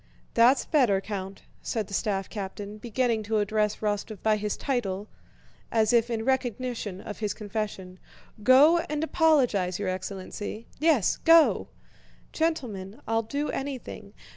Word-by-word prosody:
"That's 245 Hz, +3 st, +5 dB
better, 245 Hz, -11 st, +3 dB
Count," 195 Hz, -1 st, -6 dB, 0.2 s
said 220 Hz, -3 st, -2 dB
the 200 Hz, -, -11 dB
staff 195 Hz, -2 st, -1 dB
captain, 205 Hz, 0 st, -6 dB
beginning 235 Hz, 0 st, 0 dB
to 220 Hz, -, +2 dB
address 210 Hz, 0 st, +1 dB
Rostóv 210 Hz, 0 st, -2 dB
by 220 Hz, -1 st, +3 dB
his 210 Hz, 0 st, -3 dB
title, 210 Hz, -7 st, -2 dB, 0.6 s
as 220 Hz, 0 st, +2 dB
if 235 Hz, 0 st, +3 dB
in 225 Hz, -1 st, -2 dB
recognition 245 Hz, -6 st, -2 dB
of 210 Hz, -, -8 dB
his 210 Hz, -2 st, -2 dB
confession. 205 Hz, -3 st, -5 dB, 0.4 s
"Go 280 Hz, +9 st, +6 dB
and 300 Hz, +1 st, -1 dB
apologize, 255 Hz, -, +2 dB
your 200 Hz, -2 st, -2 dB
excellency. 195 Hz, +3 st, -5 dB
Yes, 305 Hz, -, +3 dB
go!" 330 Hz, -1 st, +5 dB, 0.7 s
"Gentlemen, 235 Hz, -, -2 dB
I'll 225 Hz, 0 st, +2 dB
do 285 Hz, +7 st, -3 dB
anything. 270 Hz, -2 st, -6 dB
220 Hz, 135 wpm, -27 LUFS, 200-255 Hz, 0.7 s, Go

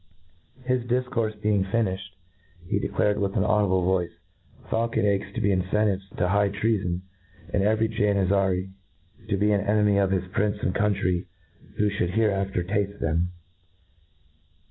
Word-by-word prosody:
' 110 Hz, +9 st, -27 dB
His 125 Hz, -1 st, +1 dB
dif 125 Hz, +1 st, +1 dB
courfe 110 Hz, -4 st, -1 dB
being 105 Hz, -2 st, +2 dB
finiflied, 95 Hz, -1 st, 0 dB, 0.7 s
he -, -, 0 dB
declared 105 Hz, 0 st, 0 dB
with 100 Hz, -1 st, -1 dB
an -, -, +3 dB
audible 95 Hz, -3 st, +2 dB
voice, 90 Hz, -2 st, +1 dB, 0.6 s
faulcon 115 Hz, -1 st, 0 dB
eggs 100 Hz, -1 st, 0 dB
to -, -, -1 dB
be 100 Hz, -, +2 dB
incentives 95 Hz, +1 st, 0 dB
to 90 Hz, -, +1 dB
high 100 Hz, +2 st, +2 dB
trea 105 Hz, +2 st, +1 dB
fpn, 90 Hz, 0 st, -2 dB, 0.5 s
and 100 Hz, -, +2 dB
every 110 Hz, +2 st, +2 dB
Janizary 100 Hz, -3 st, +1 dB, 0.6 s
to 100 Hz, -, +1 dB
be 105 Hz, +2 st, +2 dB
an 100 Hz, -1 st, +2 dB
enemy 105 Hz, 0 st, +2 dB
to 100 Hz, -1 st, +3 dB
his 95 Hz, -1 st, -1 dB
prince 105 Hz, +1 st, 0 dB
and 90 Hz, -, +1 dB
country 95 Hz, -4 st, 0 dB, 0.5 s
who 105 Hz, -1 st, +2 dB
Ihould 95 Hz, -3 st, -1 dB
hereafter 100 Hz, -4 st, +1 dB
tafte 100 Hz, +2 st, -2 dB
them. 85 Hz, +2 st, 0 dB
100 Hz, 155 wpm, -25 LUFS, 95-105 Hz, 0.7 s, an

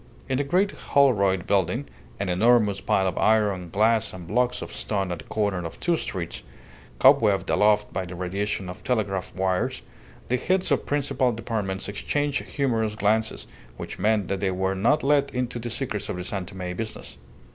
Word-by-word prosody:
In 130 Hz, 0 st, 0 dB
the -, -, +2 dB
great 185 Hz, +8 st, +2 dB
Holroyd 100 Hz, -10 st, +2 dB
building 100 Hz, +7 st, +1 dB, 0.3 s
(an 100 Hz, -, -1 dB
enormous 105 Hz, +2 st, +3 dB
pile 95 Hz, -1 st, +2 dB
of 90 Hz, -, -2 dB
iron, 105 Hz, -5 st, +2 dB
glass, 110 Hz, +3 st, +2 dB
and 90 Hz, -2 st, -8 dB
blocks 125 Hz, +7 st, 0 dB
of -, -, -8 dB
stone 95 Hz, -3 st, -2 dB
at 85 Hz, -, -4 dB
the -, -, -11 dB
corner 100 Hz, -4 st, -1 dB
of 85 Hz, -, -7 dB
two 175 Hz, -1 st, +2 dB
streets, 90 Hz, -, -4 dB, 0.6 s
cobwebbed 105 Hz, -9 st, +4 dB
aloft 105 Hz, 0 st, +3 dB
by 95 Hz, -, -2 dB
the 90 Hz, 0 st, -8 dB
radiation 95 Hz, +2 st, -2 dB
of 90 Hz, -, -8 dB
telegraph 105 Hz, -7 st, -1 dB
wires) 95 Hz, -9 st, -1 dB, 0.4 s
the 125 Hz, -, +1 dB
heads 185 Hz, +5 st, 0 dB
of 140 Hz, -, +1 dB
principal 140 Hz, -3 st, +1 dB
departments 110 Hz, -4 st, -3 dB
exchanged 145 Hz, +8 st, -1 dB
humorous 115 Hz, -6 st, -1 dB
glances, 110 Hz, +1 st, 0 dB, 0.3 s
which -, -, -7 dB
meant 105 Hz, 0 st, +2 dB
that 100 Hz, -, -2 dB
they 95 Hz, -, 0 dB
were 95 Hz, +1 st, 0 dB
not 120 Hz, +11 st, +2 dB
let 140 Hz, 0 st, +3 dB
into 125 Hz, -1 st, -2 dB
the 120 Hz, +1 st, -5 dB
secrets 110 Hz, -4 st, -3 dB
of -, -, -2 dB
the 90 Hz, -, -4 dB
San 95 Hz, 0 st, -4 dB
Tome 90 Hz, -3 st, -5 dB
business. 110 Hz, +1 st, -6 dB
105 Hz, 180 wpm, -25 LUFS, 95-125 Hz, 0.6 s, cobwebbed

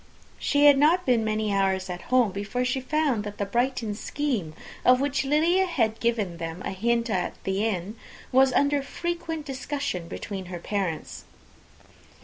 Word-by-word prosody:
She 285 Hz, 0 st, +3 dB
had 285 Hz, -2 st, +7 dB
not 335 Hz, +5 st, +4 dB
been 245 Hz, -3 st, +3 dB
many 215 Hz, -1 st, 0 dB
hours 190 Hz, -1 st, +1 dB
at 180 Hz, -1 st, -5 dB
home, 250 Hz, -5 st, +4 dB
before 205 Hz, +6 st, -2 dB
she 255 Hz, +1 st, 0 dB
found 275 Hz, -4 st, 0 dB
that 205 Hz, 0 st, -7 dB
the 200 Hz, -, -1 dB
Brighton 235 Hz, 0 st, -1 dB
scheme, 215 Hz, -, -3 dB, 0.3 s
of 250 Hz, 0 st, +6 dB
which 280 Hz, -1 st, 0 dB
Lydia 330 Hz, +7 st, +3 dB
had 225 Hz, -10 st, 0 dB
given 215 Hz, -7 st, 0 dB
them 165 Hz, +2 st, -6 dB
a -, -, -2 dB
hint 235 Hz, +5 st, 0 dB
at 185 Hz, -5 st, -1 dB
the 195 Hz, +2 st, -1 dB
inn, 200 Hz, -1 st, -2 dB, 0.4 s
was 265 Hz, +1 st, +5 dB
under 285 Hz, +1 st, +2 dB
frequent 330 Hz, +1 st, -4 dB
discussion 270 Hz, -, -3 dB
between 195 Hz, +1 st, -6 dB
her 180 Hz, 0 st, -6 dB
parents. 180 Hz, -2 st, -3 dB
235 Hz, 160 wpm, -26 LUFS, 195-280 Hz, 0.4 s, had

